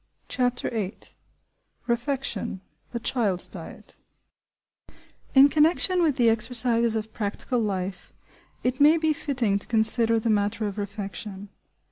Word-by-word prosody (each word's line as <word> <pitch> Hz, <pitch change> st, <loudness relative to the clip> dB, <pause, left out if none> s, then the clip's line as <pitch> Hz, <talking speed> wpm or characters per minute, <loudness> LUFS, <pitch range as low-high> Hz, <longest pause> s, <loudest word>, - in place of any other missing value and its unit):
CHAPTER 250 Hz, -2 st, -1 dB
VIII 210 Hz, -4 st, -4 dB, 0.9 s
REFECTION–THE 235 Hz, -3 st, -4 dB
CHILD'S 215 Hz, -7 st, 0 dB
DIET -, -, -12 dB, 1.4 s
IN 270 Hz, +1 st, +8 dB
connection 330 Hz, +5 st, +2 dB
with 310 Hz, -5 st, +2 dB
the 245 Hz, -4 st, +2 dB
exercises 230 Hz, 0 st, +2 dB
of 220 Hz, 0 st, -4 dB
practical 215 Hz, +4 st, -3 dB
life, 190 Hz, -4 st, -4 dB, 0.5 s
it 255 Hz, +3 st, -1 dB
may 305 Hz, +3 st, +6 dB
be 315 Hz, -1 st, +1 dB
fitting 250 Hz, -9 st, -1 dB
to -, -, -9 dB
consider 225 Hz, 0 st, +5 dB
the 225 Hz, 0 st, 0 dB
matter 210 Hz, +1 st, 0 dB
of 205 Hz, 0 st, -5 dB
refection. 200 Hz, 0 st, -7 dB
230 Hz, 115 wpm, -25 LUFS, 205-255 Hz, 1.4 s, IN